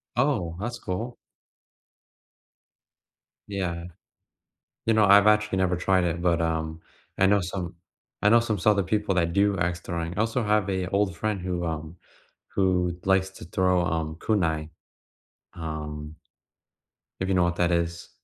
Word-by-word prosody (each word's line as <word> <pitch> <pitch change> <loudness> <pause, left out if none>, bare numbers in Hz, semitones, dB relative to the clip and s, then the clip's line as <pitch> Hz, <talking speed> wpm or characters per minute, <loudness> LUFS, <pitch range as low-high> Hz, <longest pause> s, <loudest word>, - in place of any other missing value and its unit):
Oh, 120 - +1
that's 120 +3 -4
cool. 110 +7 -4 2.3
Yeah. 90 -4 -3 1.0
You 115 - +3
know, 110 -1 +5
I've 100 +1 +7
actually 105 -2 +3
never 95 -1 +2
tried 90 0 +2
it, 85 0 -1
but, 85 -1 +2
um, 80 0 -2 0.4
I 95 - +4
know 100 +1 +4
some 90 0 -4 0.5
I 105 - +5
know 115 +2 +7
some 115 -3 -1
sorta 100 +2 +3
people 105 +1 0
that 85 -2 +1
do 100 +1 +3
axe 90 0 0
throwing. 85 0 -4
I - - +2
also 115 +2 0
have 105 -1 +2
a 95 -1 -1
old 100 -3 +1
friend 105 0 -2
who, 90 -1 -2
um 80 +1 -5 0.6
who 90 -2 +2
likes 95 0 +3
to 95 - -11
throw, 90 0 +2
um, 80 -2 -2
kunai, 80 -5 0 0.9
um 75 -1 -6 1.0
if 95 - -1
you 95 - +1
know 90 -1 +4
what 85 0 0
that 90 0 +1
is. 85 0 -1
90 Hz, 150 wpm, -26 LUFS, 85-100 Hz, 2.3 s, I've